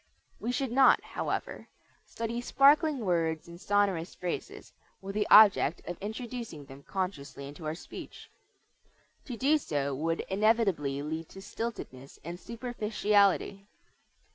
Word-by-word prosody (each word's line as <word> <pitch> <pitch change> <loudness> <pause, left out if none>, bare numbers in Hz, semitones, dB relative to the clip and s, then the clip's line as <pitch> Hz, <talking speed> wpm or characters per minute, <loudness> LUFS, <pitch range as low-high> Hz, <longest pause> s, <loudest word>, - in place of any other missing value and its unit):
We 235 - -2
should 260 0 -2
not, 265 +2 +5
however, - - -4 0.4
study 230 +1 -4
"sparkling 280 0 +4
words 165 -3 0
and 170 +1 -12
sonorous 195 -5 0
phrases" 180 -1 -6 0.3
with 195 0 -7
the 210 0 0
object 205 -7 +6
of 175 - -4
introducing 220 - -6
them 135 +1 -12
consciously 145 -7 -5
into 145 +2 -8
our 155 - -2
speech. - - -11 0.9
To 245 -4 -6
do 295 +6 +3
so 140 - -2
would 165 +4 -1
inevitably 190 -9 +1
lead 160 +2 -5
to 195 - -11
stiltedness 195 - -7
and 175 +1 -6
superficiality. 210 -4 0
195 Hz, 125 wpm, -29 LUFS, 160-230 Hz, 0.9 s, object